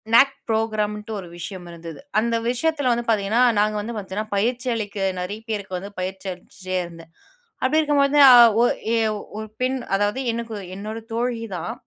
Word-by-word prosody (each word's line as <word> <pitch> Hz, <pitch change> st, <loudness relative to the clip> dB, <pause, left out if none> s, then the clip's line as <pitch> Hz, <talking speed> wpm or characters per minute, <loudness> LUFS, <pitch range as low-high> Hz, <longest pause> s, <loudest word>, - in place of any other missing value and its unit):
Knock 275 Hz, +2 st, +6 dB
ப்ரோகிராம்ன்ட்டு 215 Hz, -1 st, -1 dB
ஒரு 180 Hz, -, -8 dB
விஷயம் 180 Hz, +1 st, -7 dB
இருந்தது. 165 Hz, -1 st, -9 dB, 0.2 s
அந்த 230 Hz, 0 st, 0 dB
விஷயத்ல 285 Hz, 0 st, +1 dB
வந்து 235 Hz, 0 st, -2 dB
பார்த்தீங்கன்னா, 220 Hz, +3 st, +2 dB, 0.2 s
நாங்க 215 Hz, 0 st, +2 dB
வந்து 230 Hz, +2 st, -5 dB
பார்த்தீன்னா 200 Hz, +2 st, -4 dB
பயிற்சி 245 Hz, +4 st, 0 dB
அளிக்க 210 Hz, -2 st, -4 dB, 0.2 s
நெறைய 205 Hz, +4 st, -5 dB
பேருக்கு 195 Hz, -3 st, -3 dB
வந்து 200 Hz, +2 st, -8 dB
பயிற்சி 190 Hz, +1 st, -5 dB
அளிச்சிட்டே 185 Hz, 0 st, -5 dB
இருந்தேன். 165 Hz, -1 st, -13 dB, 0.5 s
அப்டி 310 Hz, +4 st, +3 dB
இருக்கும்போது 290 Hz, -1 st, +2 dB, 0.2 s
அ -, -, +10 dB, 0.3 s
ஒ -, -, +6 dB, 0.3 s
எ -, -, +3 dB, 0.4 s
ஒரு 220 Hz, -, -5 dB
பெண் 260 Hz, +1 st, +1 dB, 0.2 s
அதாவது, 205 Hz, +5 st, 0 dB
எனக்கு 230 Hz, -1 st, -4 dB, 0.2 s
என்னோட 215 Hz, +2 st, -5 dB, 0.2 s
தோழி 235 Hz, -1 st, -1 dB
தான். 170 Hz, +1 st, -4 dB
215 Hz, 160 wpm, -23 LUFS, 195-240 Hz, 0.5 s, அ